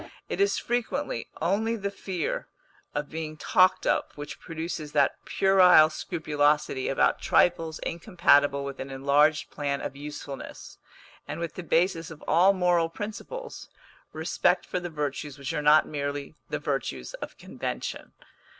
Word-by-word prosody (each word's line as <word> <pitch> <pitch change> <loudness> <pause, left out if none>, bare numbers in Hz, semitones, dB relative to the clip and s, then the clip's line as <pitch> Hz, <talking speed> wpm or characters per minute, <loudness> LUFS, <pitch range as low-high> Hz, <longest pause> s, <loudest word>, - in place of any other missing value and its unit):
It - - -2
is 400 - +3
frequently 245 +4 -2 0.2
only 215 +6 +1
the 200 -2 -3
fear 185 -5 -3 0.5
of 145 0 -3
being 155 -1 -5
talked 185 +4 +3
of - - +2
which 145 0 -8
produces 160 -2 -5
that 140 -2 +2
puerile 180 -5 +6
scrupulosity 150 -4 0
about 135 - +2
trifles 165 -2 +2
incompatible 145 -6 +2
with 140 -1 -6
an 135 - -5
enlarged 140 +3 +2
plan 140 -1 -2
of - - -5
usefulness, 145 -1 -8 0.5
and - - -5
with 170 -2 -4
the - - -6
basis 170 -1 +1
of 160 -2 -11
all 180 +4 +5
moral 175 -3 +2
principles 220 - -7 0.4
respect - - +1
for 180 - -2
the 175 0 -5
virtues 145 -2 -4
which 140 -2 -4
are - - -1
not 150 +1 +5
merely 145 0 -4 0.2
the - - -1
virtues - - -3
of - - -7
convention. - - -5
160 Hz, 140 wpm, -27 LUFS, 145-180 Hz, 0.5 s, puerile